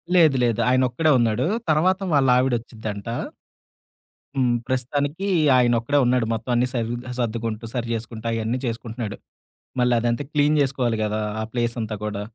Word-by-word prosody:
లేదు. 160 Hz, -6 st, +6 dB
లేదు. 115 Hz, -3 st, +1 dB
ఆయన 130 Hz, +1 st, +3 dB
ఒక్కడే 155 Hz, +6 st, +2 dB
ఉన్నాడు. 115 Hz, +2 st, +1 dB, 0.2 s
తర్వాత 180 Hz, +5 st, +3 dB
వాళ్లావిడోచ్చిద్దంట. 120 Hz, -6 st, +1 dB, 1.3 s
హ్మ్. 125 Hz, -2 st, +2 dB
ప్రస్తుతానికి 145 Hz, +8 st, -1 dB, 0.3 s
ఆయన 120 Hz, -1 st, +4 dB
ఒక్కడే 140 Hz, +5 st, +1 dB
ఉన్నాడు. 125 Hz, -1 st, +2 dB
మొత్తం 115 Hz, +2 st, -3 dB
అన్ని 125 Hz, +1 st, +2 dB
సర్వి 120 Hz, -1 st, -1 dB, 0.2 s
సర్దుకుంటూ, 115 Hz, -1 st, -2 dB
సరి 120 Hz, -1 st, -2 dB
చేేసుకుంటూ, 115 Hz, 0 st, -6 dB
అయన్ని 115 Hz, +2 st, -1 dB
చేసుకుంటున్నాడు. 115 Hz, -2 st, -4 dB, 0.6 s
మళ్ళీ 125 Hz, 0 st, +3 dB
అదంతా 120 Hz, +3 st, 0 dB
క్లీన్ 150 Hz, 0 st, +3 dB
జేసుకోవాలి 130 Hz, -4 st, 0 dB
గదా! 105 Hz, 0 st, -1 dB, 0.2 s
ఆ -, -, -1 dB
ప్లేసంతా 115 Hz, -2 st, -2 dB
కూడా. 105 Hz, -1 st, -3 dB
120 Hz, 135 wpm, -23 LUFS, 115-130 Hz, 1.3 s, లేదు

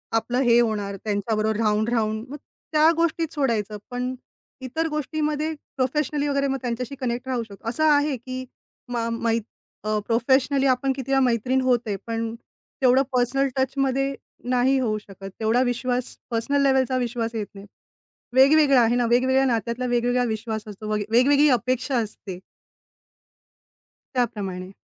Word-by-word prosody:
आपलं 240 Hz, +2 st, 0 dB
हे 240 Hz, -2 st, +5 dB
होणार 210 Hz, -4 st, 0 dB
त्यांच्याबरोबर 215 Hz, +1 st, 0 dB
राहून-राहून, 220 Hz, 0 st, 0 dB
मग 290 Hz, -, -6 dB, 0.4 s
त्या 310 Hz, 0 st, +5 dB
गोष्टीत 330 Hz, -1 st, 0 dB
सोडायचं. 225 Hz, -8 st, -1 dB
पण 250 Hz, +1 st, -2 dB, 0.5 s
इतर 320 Hz, +6 st, -2 dB
गोष्टीमध्ये 305 Hz, +1 st, -2 dB, 0.2 s
प्रोफेशनली 290 Hz, +2 st, 0 dB
वगैरे 280 Hz, -1 st, +1 dB
मग 270 Hz, -, -1 dB
त्यांच्याशी 245 Hz, +2 st, -3 dB
कनेक्ट 250 Hz, 0 st, -3 dB
राहू 250 Hz, -3 st, -1 dB
शकतो. 215 Hz, +1 st, -8 dB
असं 245 Hz, +7 st, -1 dB
आहे 290 Hz, -1 st, +3 dB
की, 255 Hz, +2 st, -6 dB, 0.4 s
मा 230 Hz, -1 st, -1 dB
मै 230 Hz, 0 st, 0 dB, 0.5 s
अ, 215 Hz, 0 st, +1 dB
प्रोफेशनली 260 Hz, +4 st, +2 dB
आपण 265 Hz, +1 st, +2 dB
किती 270 Hz, 0 st, -5 dB
वेळा 270 Hz, -, +4 dB
मैत्रीण 250 Hz, +2 st, +1 dB
होते. 240 Hz, -5 st, +1 dB
पण 225 Hz, 0 st, -2 dB, 0.5 s
तेवढं 260 Hz, 0 st, +5 dB
पर्सनल 255 Hz, +3 st, +2 dB
टचमध्ये 270 Hz, +1 st, 0 dB, 0.4 s
नाही 255 Hz, +2 st, +3 dB
होऊ 220 Hz, -4 st, 0 dB
शकत, 195 Hz, -2 st, -10 dB
तेवढा 225 Hz, +3 st, +2 dB
विश्वास 250 Hz, 0 st, -1 dB, 0.2 s
पर्सनल 260 Hz, +5 st, +1 dB
लेवलचा 265 Hz, -2 st, +2 dB
विश्वास 235 Hz, -2 st, -2 dB
येत 210 Hz, -3 st, -3 dB
नाही. 195 Hz, 0 st, -10 dB, 0.7 s
वेगवेगळा 275 Hz, -1 st, +6 dB
आहे 235 Hz, +1 st, +3 dB
ना, 245 Hz, -1 st, +2 dB
वेगवेगळ्या 260 Hz, +2 st, +3 dB
नात्यातला 235 Hz, 0 st, -1 dB
वेगवेगळा 245 Hz, 0 st, +1 dB
विश्वास 220 Hz, -1 st, -5 dB
असतो 210 Hz, +1 st, -7 dB
वगे 210 Hz, -1 st, -1 dB
वेगवेगळी 280 Hz, +5 st, +5 dB
अपेक्षा 255 Hz, +2 st, +1 dB
असते. 205 Hz, -4 st, -4 dB, 1.8 s
त्याप्रमाणे. 195 Hz, -7 st, -2 dB
245 Hz, 140 wpm, -24 LUFS, 225-270 Hz, 1.8 s, वेगवेगळा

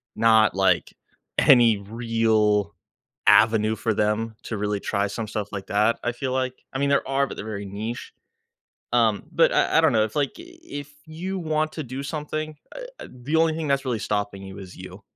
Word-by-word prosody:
not, 110 Hz, -2 st, +4 dB
like, 95 Hz, -3 st, +2 dB, 0.5 s
any 120 Hz, -5 st, +6 dB
real 110 Hz, -1 st, +1 dB, 0.5 s
avenue 110 Hz, -1 st, +5 dB
for 110 Hz, 0 st, -1 dB
them 105 Hz, +2 st, 0 dB
to 110 Hz, -, -4 dB
really 105 Hz, 0 st, -1 dB
try 100 Hz, 0 st, -1 dB
some 110 Hz, +2 st, -5 dB
stuff 105 Hz, -1 st, -4 dB
like 95 Hz, -1 st, -6 dB
that, 105 Hz, +3 st, +2 dB
I 120 Hz, -, 0 dB
feel 130 Hz, +2 st, -3 dB
like. 130 Hz, -1 st, -2 dB
I 135 Hz, -, -2 dB
mean, 140 Hz, -, +1 dB
there 140 Hz, -, +2 dB
are, 135 Hz, +1 st, +1 dB
but -, -, -8 dB
they're 105 Hz, -, -6 dB
very 100 Hz, -2 st, -5 dB
niche. 110 Hz, +4 st, -6 dB, 0.8 s
Um, -, -, +3 dB
but -, -, +4 dB
I -, -, +3 dB
I -, -, +5 dB
don't 160 Hz, -4 st, +4 dB
know, 110 Hz, -, +4 dB
it's, 110 Hz, -, -9 dB
like, 145 Hz, -3 st, +1 dB
i -, -, -7 dB
i -, -, -12 dB, 0.2 s
if 145 Hz, 0 st, -7 dB
you 180 Hz, +5 st, -5 dB
want 155 Hz, -2 st, -1 dB
to 155 Hz, -, -4 dB
do 130 Hz, +2 st, -6 dB
something, 155 Hz, +1 st, -4 dB, 0.2 s
uh -, -, -7 dB, 0.2 s
uh, -, -, -8 dB
the 130 Hz, +5 st, -4 dB
only 160 Hz, -1 st, +3 dB
thing 160 Hz, -2 st, -3 dB
that's 140 Hz, 0 st, +1 dB
really 120 Hz, -4 st, -1 dB
stopping 100 Hz, -2 st, -2 dB
you 95 Hz, +1 st, -9 dB
is 95 Hz, -2 st, -10 dB
you. 95 Hz, +2 st, -10 dB
115 Hz, 205 wpm, -24 LUFS, 105-140 Hz, 0.8 s, any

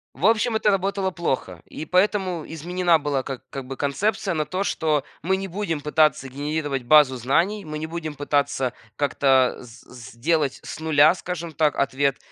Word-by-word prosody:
В 155 Hz, +10 st, +2 dB
общем, 225 Hz, +1 st, +2 dB
это 220 Hz, -1 st, +2 dB
работало 195 Hz, 0 st, 0 dB
плохо, 130 Hz, -, -3 dB
и 155 Hz, -, -8 dB
поэтому 185 Hz, -2 st, +1 dB
изменена 175 Hz, +1 st, +1 dB
была 145 Hz, -3 st, -1 dB
как 135 Hz, -2 st, -6 dB
как 135 Hz, -2 st, -6 dB
бы 135 Hz, +1 st, -6 dB
концепция 190 Hz, +6 st, -1 dB
на 155 Hz, -1 st, 0 dB
то, 185 Hz, +6 st, -2 dB
что 155 Hz, -7 st, 0 dB, 0.2 s
мы 190 Hz, +3 st, +1 dB
не 195 Hz, 0 st, -4 dB
будем 180 Hz, -5 st, -3 dB
пытаться 150 Hz, -2 st, +2 dB
генерировать 145 Hz, 0 st, -3 dB
базу 140 Hz, 0 st, +6 dB
знаний, 165 Hz, -, 0 dB
мы 155 Hz, 0 st, -5 dB
не 160 Hz, -, -4 dB
будем 160 Hz, -2 st, -5 dB
пытаться 145 Hz, -3 st, 0 dB, 0.2 s
как-то 135 Hz, -2 st, +2 dB
с 120 Hz, -1 st, -13 dB
с 125 Hz, -3 st, -12 dB
сделать 145 Hz, +4 st, 0 dB
с -, -, -7 dB
0, 155 Hz, +1 st, +5 dB
скажем 170 Hz, -2 st, -5 dB
так, 155 Hz, -1 st, +1 dB
ответ, 140 Hz, 0 st, +1 dB
155 Hz, 175 wpm, -23 LUFS, 140-180 Hz, 0.2 s, базу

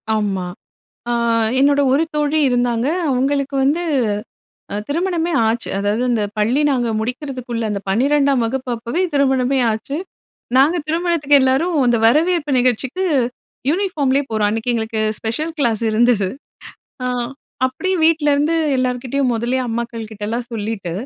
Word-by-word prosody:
ஆமா. 200 Hz, -4 st, -1 dB, 0.7 s
அ -, -, +1 dB, 0.5 s
என்னோட 285 Hz, +1 st, +4 dB
ஒரு 285 Hz, +4 st, +3 dB
தோழி 300 Hz, +1 st, +1 dB
இருந்தாங்க. 245 Hz, 0 st, +1 dB, 0.2 s
அவங்களுக்கு 275 Hz, +2 st, 0 dB
வந்து 300 Hz, +6 st, +1 dB, 0.9 s
அ -, -, -2 dB
திருமணமே 340 Hz, +2 st, -1 dB, 0.2 s
ஆச்சு, 230 Hz, +1 st, -1 dB
அதாவது 205 Hz, +4 st, 0 dB
அந்த 225 Hz, -3 st, +1 dB
பள்ளி 235 Hz, +7 st, +2 dB
நாங்க 245 Hz, -3 st, 0 dB
முடிக்கிறதுக்குள்ள 250 Hz, -1 st, -4 dB
அந்த 200 Hz, -, -2 dB
பன்னிரெண்டாம் 275 Hz, +4 st, +2 dB
வகுப்பப்பவே 245 Hz, +4 st, -2 dB
திருமணமே 265 Hz, -1 st, +2 dB
ஆச்சு. 220 Hz, +7 st, -4 dB, 0.6 s
நாங்க 290 Hz, +6 st, +5 dB
திருமணத்துக்கு 325 Hz, -3 st, +2 dB
எல்லாரும், 270 Hz, +7 st, +2 dB
அந்த 240 Hz, -1 st, +3 dB
வரவேற்பு 310 Hz, +3 st, +2 dB
நிகழ்ச்சிக்கு 255 Hz, -, 0 dB, 0.7 s
யூனிஃபார்ம்லே 300 Hz, -7 st, +1 dB
போறோம். 215 Hz, -1 st, +1 dB
அன்னைக்கு 225 Hz, +3 st, -1 dB
எங்களுக்கு 220 Hz, -1 st, -2 dB, 0.2 s
ஸ்பெஷல் 300 Hz, +9 st, -2 dB
கிளாஸ் 235 Hz, -5 st, +1 dB
இருந்தது. 220 Hz, -3 st, +3 dB, 0.8 s
அ -, -, 0 dB, 0.6 s
அப்படியே 370 Hz, +9 st, -1 dB
வீட்லேருந்து 305 Hz, -1 st, +3 dB, 0.2 s
எல்லார்கிட்டேயும் 255 Hz, +1 st, 0 dB
முதல்லே 240 Hz, +3 st, -1 dB
அம்மாக்கள் 230 Hz, -1 st, -4 dB
கிட்டெல்லாம் 220 Hz, +3 st, -4 dB
சொல்லிட்டு, 215 Hz, -5 st, -4 dB
255 Hz, 120 wpm, -19 LUFS, 230-290 Hz, 0.9 s, நாங்க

